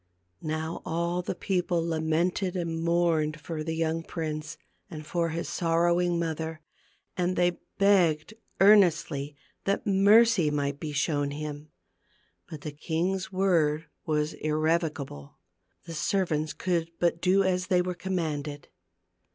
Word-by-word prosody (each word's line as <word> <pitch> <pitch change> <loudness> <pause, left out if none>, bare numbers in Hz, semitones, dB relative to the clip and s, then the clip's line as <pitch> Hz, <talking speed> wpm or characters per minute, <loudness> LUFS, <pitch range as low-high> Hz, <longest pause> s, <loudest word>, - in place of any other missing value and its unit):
Now 160 +1 -3
all 170 +2 -1
the 180 - -4
people 180 -2 0
lamented 170 +3 0
and 165 -2 -2
mourned 165 -3 +1
for 155 -1 -5
the 160 +1 -3
young 165 0 0
prince 155 -1 -5 0.3
and 155 -3 -8
for 170 +1 0
his 165 +2 -3
sorrowing 175 +1 +1
mother, 160 -1 -3 0.6
and 180 0 0
they 175 0 +1 0.2
begged 185 -4 +3 0.3
earnestly 170 -8 +4 0.3
that 200 +3 0
mercy 205 -2 +5
might 145 -1 -1
be 155 0 -4
shown 145 0 0
him. 150 +1 -6 0.8
But 155 -2 -8
the 150 - -5
king's 180 +5 -2
word 165 -5 +2 0.2
was 150 0 0
irrevo 155 +2 +2
cable. 75 - -9 0.5
The 165 - -8
servants 155 -2 0
could 170 -3 -1
but 170 -1 +1
do 190 +2 +4
as 185 -1 0
they 180 -1 +3
were 180 0 -2
commanded. 155 -5 -3
165 Hz, 130 wpm, -28 LUFS, 155-180 Hz, 0.8 s, mercy